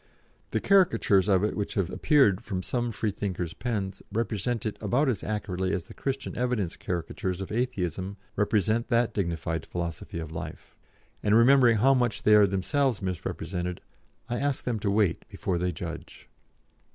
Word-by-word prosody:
The -, -, 0 dB
caricatures 115 Hz, -, +4 dB
of 95 Hz, -1 st, +4 dB
it 105 Hz, -, 0 dB
which 105 Hz, -, -3 dB
have 95 Hz, -4 st, 0 dB
appeared 125 Hz, -, +3 dB
from 95 Hz, -5 st, -3 dB
some 120 Hz, +2 st, -1 dB
Freethinkers' 100 Hz, -5 st, -3 dB
pens 100 Hz, -3 st, -3 dB
represent 115 Hz, +1 st, -1 dB
it 110 Hz, -, -2 dB
about 140 Hz, +5 st, +2 dB
as 125 Hz, -5 st, 0 dB
accurately 95 Hz, -3 st, -2 dB
as 90 Hz, -, -3 dB
the -, -, -13 dB
Christian 135 Hz, -1 st, -3 dB
Evidence 120 Hz, -8 st, -1 dB
caricatures 90 Hz, +1 st, -3 dB
of 95 Hz, -, -6 dB
Atheism 100 Hz, -5 st, -2 dB, 0.2 s
represent 110 Hz, +3 st, +1 dB
that 120 Hz, -1 st, +2 dB
dignified 85 Hz, -3 st, -2 dB
philosophy 85 Hz, -1 st, -5 dB
of 80 Hz, -2 st, -5 dB
life; 80 Hz, -, -8 dB, 0.5 s
and, 105 Hz, +1 st, +3 dB
remembering 120 Hz, 0 st, +6 dB
how 135 Hz, +6 st, +5 dB
much 125 Hz, -3 st, 0 dB
they 105 Hz, -, +5 dB
are 105 Hz, -1 st, +7 dB
themselves 105 Hz, +6 st, +1 dB
misrepresented, 90 Hz, -1 st, -3 dB, 0.5 s
I 120 Hz, 0 st, -2 dB
ask 140 Hz, -1 st, -1 dB
them 120 Hz, -3 st, -1 dB
to 100 Hz, -, -1 dB
wait 100 Hz, -4 st, +1 dB
before 90 Hz, -2 st, -2 dB
they 90 Hz, +1 st, 0 dB
judge." 85 Hz, -1 st, -8 dB
105 Hz, 160 wpm, -27 LUFS, 90-120 Hz, 0.5 s, are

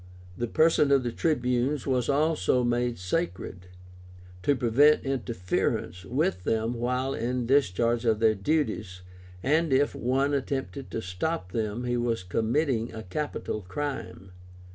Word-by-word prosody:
The 120 Hz, +5 st, -2 dB
person 155 Hz, +2 st, +3 dB
of 135 Hz, -2 st, +4 dB
the 120 Hz, -, -2 dB
Tribunes 125 Hz, -1 st, 0 dB
was 125 Hz, -3 st, 0 dB
also 145 Hz, -3 st, +2 dB
made 120 Hz, 0 st, 0 dB
sacred, 90 Hz, -, -3 dB, 0.7 s
to 140 Hz, +9 st, +2 dB
prevent 130 Hz, +5 st, +4 dB
interference 90 Hz, -8 st, -2 dB
with 90 Hz, +2 st, 0 dB
them 115 Hz, +3 st, 0 dB
while 125 Hz, +3 st, -1 dB
in 125 Hz, 0 st, -2 dB
discharge 120 Hz, -2 st, +2 dB
of 110 Hz, -2 st, +2 dB
their 110 Hz, -1 st, +4 dB
duties, 105 Hz, -, -1 dB, 0.4 s
and 155 Hz, +3 st, +2 dB
if 135 Hz, +2 st, +3 dB
any -, -, -8 dB
one 135 Hz, +3 st, +2 dB
attempted 135 Hz, 0 st, -3 dB
to 115 Hz, -, -4 dB
stop 95 Hz, -, -3 dB
them 110 Hz, +2 st, -2 dB
he 120 Hz, 0 st, 0 dB
was 115 Hz, -4 st, -1 dB
committing 115 Hz, -, 0 dB
a 110 Hz, 0 st, -7 dB
capital 110 Hz, 0 st, -4 dB
crime. 95 Hz, -, -5 dB
120 Hz, 140 wpm, -27 LUFS, 110-140 Hz, 0.7 s, of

